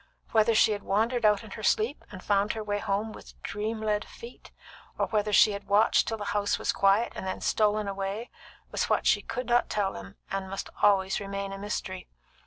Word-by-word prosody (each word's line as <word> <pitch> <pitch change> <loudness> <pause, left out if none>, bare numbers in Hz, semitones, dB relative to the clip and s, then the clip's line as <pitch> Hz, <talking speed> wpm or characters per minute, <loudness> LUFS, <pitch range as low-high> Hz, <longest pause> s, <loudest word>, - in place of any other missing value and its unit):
Whether 220 0 +4
she 220 - +5
had 205 -1 -2
wandered 225 +5 0
out 210 0 +4
in 215 - -12
her 220 - -7
sleep, 220 +6 +1
and 185 -2 -9
found 205 0 +1
her 220 - -5
way 205 -1 -2
home 205 +2 -1
with - - -13
dream 215 +2 -3
led 210 -1 0
feet, 235 +1 -12 0.5
or - - +1
whether 210 -1 0
she 210 - +6
had 200 0 -6
watched 205 +2 +4
till 225 - -2
the 205 - -5
house 205 -1 +1
was - - 0
quiet, 200 +4 +3
and 190 - -5
then 185 - -3
stolen 215 -1 +1
away, 195 +4 -4 0.4
was - - 0
what - - +1
she - - +4
could 250 - -4
not 240 +1 +2
tell 200 -2 0
them, 95 -1 -10 0.2
and 195 -1 -3
must 195 +1 -5
always 195 -1 +3
remain 200 -1 -4
a 195 - -7
mystery. 190 -2 -5
205 Hz, 210 wpm, -28 LUFS, 195-220 Hz, 0.5 s, she